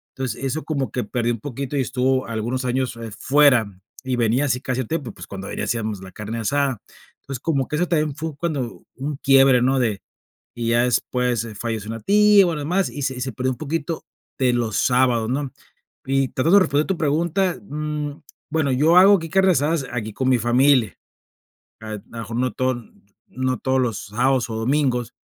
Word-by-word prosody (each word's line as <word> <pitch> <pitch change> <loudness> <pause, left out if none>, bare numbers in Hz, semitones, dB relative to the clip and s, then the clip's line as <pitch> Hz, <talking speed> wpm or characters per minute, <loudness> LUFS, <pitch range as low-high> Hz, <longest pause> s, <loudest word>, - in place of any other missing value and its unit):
Entonces 130 -2 -4
eso 140 +4 -2
como 140 -4 -2
que 125 - -2
perdió 120 +3 -1
un 115 - -6
poquito, 140 +3 -4
y - - +2
estuvo 130 +1 0
algunos 120 +3 -3
años, 125 0 -1
eh, 115 -1 -7
fuera, 140 -4 +4 0.4
y 130 -1 -1
venía 120 +4 +2
así 125 -3 0
casi 130 -1 -2
a - - -4
tiempo, 140 -2 -3
pues, - - -11
cuando 95 0 -7
ahí - - -6
le - - -3
hacíamos 110 -4 -2
la 95 0 -10
carne 105 +4 -5
asada. 135 0 0 0.4
Entonces 135 -3 -6
como 140 -5 0
que - - -3
eso 180 +2 +1
también 155 -4 0
fue 160 -1 -5
cuando 140 -7 -3
un 140 +2 -4
quiebre, 135 -2 +5
¿no? 135 +1 +2
De 110 -5 0 0.5
y 115 -1 -2
ya 120 +1 +3
después 125 -1 0
falleció 110 -3 -3
una 115 0 -4
tia, 210 - +5
y - - +6
bueno 170 -3 0
lo - - -4
demás, 180 +5 +1
y 145 - -7
se 130 -1 -1
y 125 - -6
se 130 +1 -2
perdió 130 +1 -1
un - - -13
poquito 160 +1 -3 0.3
de 130 -3 +2
los 115 -3 -1
sábados, 125 -3 +2
¿no? 135 +1 -2 0.5
Y 135 0 +1
tratando 165 +9 +3
de - - +6
responder 145 -2 +1
tu 190 - -1
pregunta, 170 +5 0
mm, 150 0 -4 0.3
bueno, 155 -3 +1
yo 155 +7 +4
hago 195 +2 +8
aquí 165 -2 -6
carne 190 +2 +4
asadas 150 -1 +1
aquí 110 -3 -4
con 130 +5 -2
mi 125 -2 +3
familia, 120 -2 +3 0.8
a 110 0 -6
lo 105 - -9
mejor 115 0 -6
no 125 +1 0
todo 130 -2 -1 0.4
no 130 0 -2
todos 130 0 +1
los 115 -5 -1
sábados 125 +4 +1
o - - -3
domingos, 125 0 0
130 Hz, 205 wpm, -22 LUFS, 120-145 Hz, 0.8 s, hago